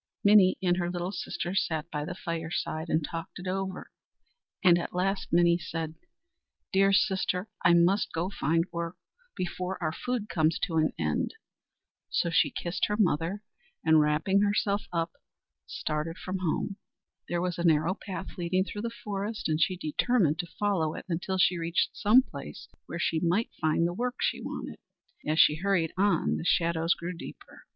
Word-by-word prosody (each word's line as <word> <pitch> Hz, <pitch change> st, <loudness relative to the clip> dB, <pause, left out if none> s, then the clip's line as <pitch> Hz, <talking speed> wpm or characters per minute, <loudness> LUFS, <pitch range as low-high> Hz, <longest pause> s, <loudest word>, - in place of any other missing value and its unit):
Minnie 200 Hz, -2 st, +6 dB
and 175 Hz, -1 st, +3 dB
her 175 Hz, -1 st, -1 dB
little 175 Hz, +1 st, -3 dB
sister 180 Hz, -1 st, -4 dB
sat 165 Hz, -3 st, -1 dB
by 150 Hz, -1 st, -2 dB
the 180 Hz, +2 st, -5 dB
fireside 165 Hz, -1 st, -3 dB
and 155 Hz, -1 st, +1 dB
talked 165 Hz, +1 st, -6 dB
it 180 Hz, -, -8 dB
over, 190 Hz, 0 st, -3 dB, 0.7 s
and 175 Hz, -2 st, +6 dB
at 175 Hz, -, -5 dB
last 195 Hz, +2 st, 0 dB
Minnie 170 Hz, 0 st, +4 dB
said: 165 Hz, -2 st, -4 dB, 0.8 s
"Dear 195 Hz, +1 st, +5 dB
sister, 190 Hz, 0 st, +1 dB
I 170 Hz, -, +6 dB
must 180 Hz, +4 st, +3 dB
go 165 Hz, +2 st, -1 dB
out 190 Hz, -, -4 dB
to -, -, -12 dB
find 165 Hz, +2 st, +2 dB
work, 170 Hz, +1 st, -4 dB, 0.4 s
before 185 Hz, +1 st, -3 dB
the 155 Hz, -3 st, -1 dB
food 240 Hz, +5 st, -3 dB
comes 160 Hz, -4 st, +1 dB
to 165 Hz, -4 st, 0 dB
an 155 Hz, 0 st, +3 dB
end." -, -, -1 dB, 0.7 s
So 170 Hz, -, 0 dB
she -, -, +4 dB
kissed 175 Hz, +1 st, -1 dB
her 210 Hz, -, -1 dB
mother, 185 Hz, 0 st, +1 dB, 0.4 s
and, 160 Hz, -1 st, +6 dB
wrapping 150 Hz, +6 st, +2 dB
herself 205 Hz, 0 st, +1 dB
up, 165 Hz, -1 st, -1 dB, 0.6 s
started 155 Hz, +3 st, -3 dB
from 185 Hz, 0 st, -4 dB
home. 185 Hz, +3 st, -1 dB, 0.5 s
There 175 Hz, -, 0 dB
was 175 Hz, -1 st, -2 dB
a -, -, -1 dB
narrow 160 Hz, +1 st, +3 dB
path 190 Hz, -1 st, -7 dB
leading 180 Hz, +2 st, +1 dB
through 205 Hz, +1 st, -6 dB
the 235 Hz, -, -2 dB
forest, 210 Hz, +1 st, -3 dB
and 155 Hz, 0 st, 0 dB
she 185 Hz, +3 st, +2 dB
determined 165 Hz, 0 st, +1 dB
to 175 Hz, -, -2 dB
follow 185 Hz, -7 st, +1 dB
it -, -, -7 dB
until 180 Hz, +3 st, -1 dB
she 180 Hz, -1 st, +3 dB
reached 165 Hz, +2 st, 0 dB
some 235 Hz, +6 st, +5 dB
place -, -, -9 dB, 0.2 s
where 170 Hz, -, -5 dB
she 165 Hz, -1 st, +1 dB
might 180 Hz, +7 st, +1 dB
find 155 Hz, +1 st, +2 dB
the 175 Hz, -, 0 dB
work 245 Hz, +5 st, -2 dB
she -, -, 0 dB
wanted. -, -, -6 dB, 0.5 s
As 155 Hz, +1 st, +1 dB
she 150 Hz, -, +6 dB
hurried 185 Hz, -3 st, +1 dB
on, 200 Hz, +2 st, +2 dB
the -, -, -5 dB
shadows 165 Hz, 0 st, +2 dB
grew 175 Hz, +2 st, -5 dB
deeper. 165 Hz, -, -11 dB
175 Hz, 175 wpm, -29 LUFS, 165-195 Hz, 0.8 s, Minnie